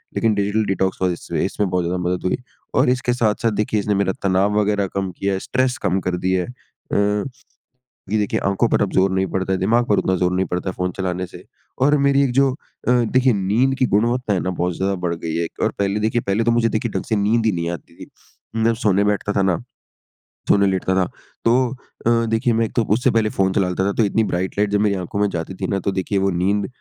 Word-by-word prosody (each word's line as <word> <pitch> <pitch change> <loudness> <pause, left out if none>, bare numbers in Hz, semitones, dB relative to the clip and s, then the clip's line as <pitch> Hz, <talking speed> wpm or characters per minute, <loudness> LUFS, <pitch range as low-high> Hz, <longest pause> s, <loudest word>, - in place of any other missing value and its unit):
लेकिन 115 -1 +2
digital 100 +2 +1
detox 95 -1 -1
वज़ह 90 -2 +1
से - - -2
इसमें 105 -2 -1
बहुत 90 0 0
ज़्यादा 90 +2 -1
मदद 90 +1 -1
हुई, 90 - +1 0.4
और - - +3
इसके 125 -1 +1
साथ-साथ 115 -1 +1
देखिए 105 0 0
इसने 105 0 0
मेरा 100 -1 +1
तनाव 100 +2 +2
वग़ैरह 100 -1 +1
कम 95 -1 -2
किया 100 +2 -2
है, 95 - -1
स्ट्रेस 130 +4 0
कम 95 -1 +1
कर 90 -1 0
दिया 95 +1 +1
है। - - -8
अ, 105 -4 -2 0.9
ये 110 - +2
देखिए 105 - 0
आँखों 105 +4 +1
पर - - +2
अब 100 - -1
ज़ोर 95 +1 +3
नहीं 95 0 +1
पड़ता 95 0 -1
है। 95 - +1
दिमाग 115 +6 +2
पर 105 - +3
उतना 95 - +1
ज़ोर 90 0 +1
नहीं 95 - +1
पड़ता 90 +1 -3
है - - -8
फ़ोन 90 0 -1
चलाने 90 -1 -2
से। - - -13 0.3
और 145 +3 +4
मेरी 140 0 +4
एक 130 - 0
जो 135 -1 +3
अ, 125 - -7
देखिए 125 +1 +3
नींद 110 +7 +1
की 130 - +3
गुणवत्ता 120 +1 +1
है 95 - +1
ना 95 - -2
बहुत 90 -1 -2
ज़्यादा 95 +1 0
बढ़ 85 - 0
गई 80 -1 -5
है। 85 - 0
एक 80 - -9
और - - +2
पहले 100 +1 0
देखिए 110 +2 +1
पहले 100 +3 +1
तो 120 - +3
मुझे 115 0 +3
देखिए 110 0 -2
ढंग - - -2
से - - +4
नींद 110 +3 +2
ही 110 - +3
नहीं 85 -1 -2
आती 85 - -8
थी। - - -23 0.5
मैं 115 +1 +2
सोने 100 -4 +2
बैठता 105 0 0
था 100 - +1
ना। 95 +2 +1 0.9
सोने 100 0 +4
लेटता 95 -1 0
था 95 -1 +3 0.4
तो 115 - +4 0.5
अ, - - +5 0.2
देखिए 115 +2 +2
मैं 115 +1 +2
एक - - -11
तो 120 - +4
उससे 125 +3 +2
पहले 115 -2 +2
फ़ोन 95 -1 +2
चला 95 -1 +1
लेता 90 +1 -1
था 100 - +1
तो 115 - +5
इतनी 110 +2 +1
ब्राइट 95 -1 -2
लाइट 105 0 +2
जब 105 0 +1
मेरी 105 -1 +2
आँखों 95 +2 -4
में 105 - +3
जाती 85 +2 -4
थी 95 - 0
ना 100 - -1
तो 100 - +2
देखिए 95 +1 -1
वो 95 0 +2
नींद 100 +3 0
100 Hz, 250 wpm, -21 LUFS, 95-110 Hz, 0.9 s, अ